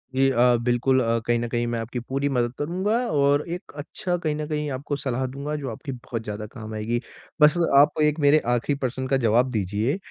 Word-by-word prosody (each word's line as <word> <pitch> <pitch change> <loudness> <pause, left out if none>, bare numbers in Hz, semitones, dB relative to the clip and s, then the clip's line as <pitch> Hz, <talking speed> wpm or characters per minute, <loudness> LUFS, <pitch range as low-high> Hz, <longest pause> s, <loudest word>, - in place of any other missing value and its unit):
जी 135 +1 +4
अ, 125 0 +4
बिल्कुल 125 +2 +2
अ, 115 0 +1
कहीं 120 0 +2
न 120 - -2
कहीं 120 0 -1
मैं 120 -1 -2
आपकी 115 +2 -4
पूरी 135 +4 -2
मदद 120 -3 0
करूँगा, 185 +8 0
और 145 -1 +3
एक 175 +3 -6
अच्छा 175 +5 -3
कहीं 155 -3 -2
न 150 0 -4
कहीं 150 -1 -2
आपको 140 +2 -3
सलाह 130 -2 -2
दूँगा 140 +3 -4
जो 140 -3 -4
आपकी 125 +5 -7
बहुत 120 -2 -6
ज़्यादा 105 0 -5
काम 110 -3 -8
आएगी। 110 +3 -1 0.4
बस 150 +2 +7 0.2
आप 150 +2 +5
एक 150 +1 +2
मेरे 145 +1 +5
आखरी 120 +4 0
प्रश्न 130 -1 -3
का 135 +1 +2
जवाब 120 +1 +3
दीजिए 105 - -1
130 Hz, 215 wpm, -24 LUFS, 120-145 Hz, 0.4 s, बस